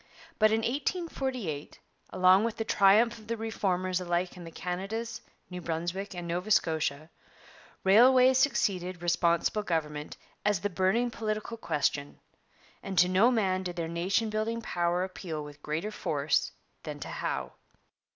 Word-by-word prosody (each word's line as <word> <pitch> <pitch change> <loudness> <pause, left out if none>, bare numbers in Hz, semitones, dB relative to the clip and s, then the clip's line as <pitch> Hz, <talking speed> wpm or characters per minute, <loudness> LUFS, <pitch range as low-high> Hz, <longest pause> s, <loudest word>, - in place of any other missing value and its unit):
But 215 0 +6
in 220 +1 +2
1848, 260 - -3 0.3
along 185 +2 +5
with 230 -1 -2
the 225 - -1
triumph 220 +3 +4
of 215 - -16
the 230 0 -2
Reformers 185 -5 -1
alike 175 +1 -1
in 175 -2 -10
the - - -7
Canadas, 205 +8 -4 0.3
New 180 -1 -7
Brunswick, 175 +4 -3
and 175 -1 -5
Nova 180 +4 -3
Scotia, 155 -5 +1 0.7
railways 255 +6 +6
succeeded 185 - 0
Responsible 170 +4 +2
Government 150 -5 -3 0.3
as 205 -4 +1
the 205 - -2
burning 190 +7 +1
political 215 0 -3
question, 145 -8 -2 0.6
and 195 -1 -6
to 175 +2 +6
no 190 +6 +4
man 195 -6 +1
did 180 -2 -5
their 170 -2 -3
nation 185 +7 0
building 220 +2 -1
power 175 -2 0
appeal 175 -5 -5
with 145 0 -11
greater 160 +9 -3
force 150 -7 0 0.3
than - - -7
to - - -5
Howe. - - -3
185 Hz, 145 wpm, -29 LUFS, 170-220 Hz, 0.7 s, But